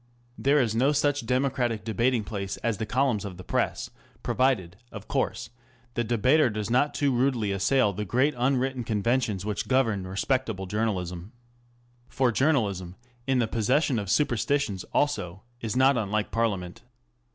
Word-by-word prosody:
There 140 Hz, +2 st, +2 dB
is 115 Hz, -5 st, +1 dB
no 130 Hz, +6 st, +2 dB
such 145 Hz, -3 st, 0 dB
democratic 125 Hz, -4 st, 0 dB
debating 115 Hz, +2 st, +1 dB
place 100 Hz, -2 st, -4 dB
as 115 Hz, -4 st, -1 dB
the 110 Hz, -, -3 dB
columns 125 Hz, -5 st, +1 dB
of 95 Hz, -4 st, -7 dB
the 90 Hz, -, -9 dB
Press -, -, -2 dB
.* -, -, -31 dB
provided, 115 Hz, -10 st, +1 dB, 0.2 s
of -, -, -9 dB
course, -, -, -2 dB, 0.4 s
the 120 Hz, -, 0 dB
debater 125 Hz, +6 st, +3 dB
does 105 Hz, 0 st, -4 dB
not 145 Hz, +4 st, +2 dB
too 145 Hz, -2 st, +1 dB
rudely 120 Hz, -5 st, +1 dB
assail 105 Hz, +3 st, +2 dB
the 105 Hz, +3 st, -3 dB
great 130 Hz, +9 st, +1 dB
unwritten 130 Hz, 0 st, 0 dB
conven 115 Hz, +3 st, +1 dB
tions 100 Hz, -5 st, -3 dB
which 105 Hz, 0 st, -3 dB
govern 110 Hz, -8 st, +1 dB
respectable 105 Hz, 0 st, -1 dB
journalism. 95 Hz, -3 st, -3 dB, 0.8 s
For 130 Hz, -3 st, +1 dB
journalism 105 Hz, -, 0 dB, 0.3 s
in 135 Hz, -1 st, +2 dB
the 120 Hz, -2 st, +2 dB
possession 125 Hz, +4 st, +1 dB
of 100 Hz, -3 st, -5 dB
superstitions 120 Hz, -3 st, +1 dB
also 100 Hz, -11 st, -1 dB, 0.2 s
is 115 Hz, -1 st, -4 dB
not 130 Hz, +1 st, +4 dB
unlike 105 Hz, 0 st, -1 dB
Parliament. 100 Hz, -6 st, -2 dB
115 Hz, 155 wpm, -27 LUFS, 100-130 Hz, 0.8 s, not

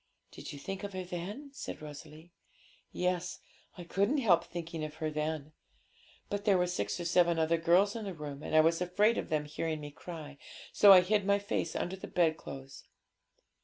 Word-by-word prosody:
'Did -, -, -8 dB
you 145 Hz, -, -8 dB
think 195 Hz, +7 st, -6 dB
of 200 Hz, -1 st, -5 dB
her 185 Hz, 0 st, -3 dB
then?' 190 Hz, +11 st, -6 dB
said -, -, -6 dB
Rosalie. 155 Hz, +2 st, -11 dB, 0.6 s
'Yes; 180 Hz, 0 st, -1 dB, 0.4 s
I 175 Hz, -, -7 dB
couldn't 200 Hz, -, +1 dB
help 185 Hz, -, +4 dB
thinking 170 Hz, -2 st, -6 dB
of 155 Hz, 0 st, -5 dB
her 155 Hz, -1 st, -3 dB
then; 155 Hz, 0 st, -3 dB, 0.8 s
but 205 Hz, 0 st, -3 dB
there 200 Hz, -3 st, +4 dB
were 180 Hz, -, +2 dB
six 100 Hz, -, -2 dB
or 175 Hz, -, -4 dB
seven 170 Hz, 0 st, +3 dB
other 165 Hz, +1 st, +2 dB
girls 185 Hz, +5 st, +4 dB
in 225 Hz, -2 st, -4 dB
the 195 Hz, -3 st, -5 dB
room, 145 Hz, -2 st, -7 dB
and 155 Hz, -, -3 dB
I 155 Hz, -, +8 dB
was 165 Hz, +2 st, +2 dB
afraid 205 Hz, +6 st, +2 dB
of -, -, -5 dB
them 150 Hz, -1 st, 0 dB
hearing 155 Hz, +1 st, -3 dB
me 145 Hz, -1 st, -8 dB
cry, 150 Hz, -3 st, -9 dB, 0.3 s
so 205 Hz, -, +8 dB
I 185 Hz, -2 st, +10 dB
hid 205 Hz, +3 st, +1 dB
my 200 Hz, +1 st, +3 dB
face 200 Hz, -5 st, -2 dB
under 185 Hz, -, -2 dB
the 190 Hz, -, -8 dB
bedclothes. 155 Hz, -5 st, -2 dB
170 Hz, 195 wpm, -32 LUFS, 155-190 Hz, 0.8 s, I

